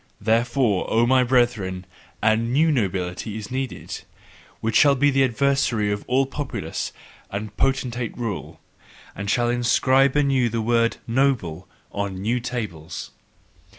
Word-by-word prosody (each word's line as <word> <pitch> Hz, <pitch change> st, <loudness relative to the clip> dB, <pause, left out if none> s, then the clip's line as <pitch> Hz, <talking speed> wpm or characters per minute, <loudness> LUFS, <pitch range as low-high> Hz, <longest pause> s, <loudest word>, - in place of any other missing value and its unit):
Therefore, 115 Hz, -1 st, +1 dB
O 115 Hz, +1 st, +4 dB
my 130 Hz, +1 st, +4 dB
brethren, 115 Hz, -7 st, +1 dB, 0.4 s
a 110 Hz, 0 st, +5 dB
NEW 125 Hz, +8 st, +2 dB
NOBILITY 100 Hz, -3 st, -2 dB
is 105 Hz, +1 st, -8 dB
needed, 130 Hz, 0 st, -4 dB, 0.6 s
which 115 Hz, 0 st, -2 dB
shall 140 Hz, -1 st, +6 dB
be 145 Hz, +2 st, +3 dB
the 135 Hz, 0 st, +3 dB
adversary 125 Hz, -4 st, +1 dB
of 100 Hz, 0 st, -3 dB
all 130 Hz, +2 st, +3 dB
populace 130 Hz, -, -4 dB, 0.4 s
and 105 Hz, +1 st, -5 dB
potentate 125 Hz, -3 st, -1 dB
rule, 115 Hz, -6 st, -5 dB, 0.6 s
and 100 Hz, 0 st, -4 dB
shall 120 Hz, +2 st, +2 dB
inscribe 130 Hz, +3 st, +3 dB
anew 135 Hz, -4 st, +2 dB
the 115 Hz, +1 st, -2 dB
word 115 Hz, +1 st, +2 dB
"noble" 115 Hz, -, 0 dB, 0.2 s
on 100 Hz, -1 st, -3 dB
new 110 Hz, +6 st, -1 dB
tables. 100 Hz, -10 st, -5 dB
120 Hz, 130 wpm, -23 LUFS, 105-130 Hz, 0.6 s, shall